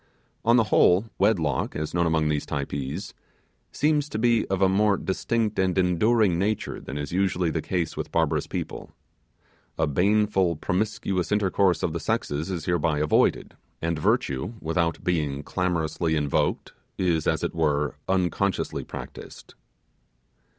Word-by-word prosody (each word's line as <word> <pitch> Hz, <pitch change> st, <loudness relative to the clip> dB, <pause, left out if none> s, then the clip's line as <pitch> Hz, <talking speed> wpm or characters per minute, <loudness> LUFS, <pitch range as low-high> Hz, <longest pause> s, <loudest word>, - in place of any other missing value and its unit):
On 115 Hz, +1 st, +4 dB
the 115 Hz, -, +5 dB
whole, 90 Hz, +5 st, +5 dB
wedlock, 85 Hz, -10 st, +1 dB
as 75 Hz, +1 st, -3 dB
known 85 Hz, -1 st, +2 dB
among 80 Hz, -1 st, +1 dB
these 75 Hz, -1 st, 0 dB
Typees, 70 Hz, +5 st, -4 dB, 0.6 s
seems 150 Hz, 0 st, +1 dB
to 110 Hz, -, -4 dB
be 115 Hz, 0 st, +2 dB
of 95 Hz, -1 st, -1 dB
a 95 Hz, -, +5 dB
more 100 Hz, +1 st, +3 dB
distinct 110 Hz, +3 st, -1 dB
and 95 Hz, -1 st, +1 dB
enduring 95 Hz, +1 st, +3 dB
nature 105 Hz, +2 st, -2 dB
than 70 Hz, -, -6 dB
is 75 Hz, -1 st, -4 dB
usually 90 Hz, -2 st, +1 dB
the 80 Hz, -, -1 dB
case 85 Hz, -2 st, -2 dB
with -, -, -5 dB
barbarous -, -, +1 dB
people. -, -, -5 dB, 0.9 s
A 80 Hz, -, +2 dB
baneful 95 Hz, +2 st, +2 dB
promiscuous 95 Hz, +1 st, -1 dB
intercourse 100 Hz, -2 st, +2 dB
of 80 Hz, -, 0 dB
the 85 Hz, -, -2 dB
sexes 75 Hz, +2 st, -2 dB
is 90 Hz, -4 st, -4 dB
hereby 80 Hz, -3 st, +1 dB
avoided, 75 Hz, 0 st, +1 dB, 0.2 s
and 85 Hz, -1 st, -2 dB
virtue, 75 Hz, -, 0 dB
without 85 Hz, 0 st, -1 dB
being 75 Hz, -6 st, -1 dB
clamorously 85 Hz, -1 st, -1 dB
invoked, 75 Hz, -2 st, 0 dB, 0.2 s
is, 85 Hz, -4 st, +1 dB
as -, -, +1 dB
it -, -, -1 dB
were, 75 Hz, -3 st, 0 dB, 0.2 s
unconsciously 95 Hz, +1 st, 0 dB
practised. -, -, -10 dB
90 Hz, 145 wpm, -25 LUFS, 80-100 Hz, 0.9 s, the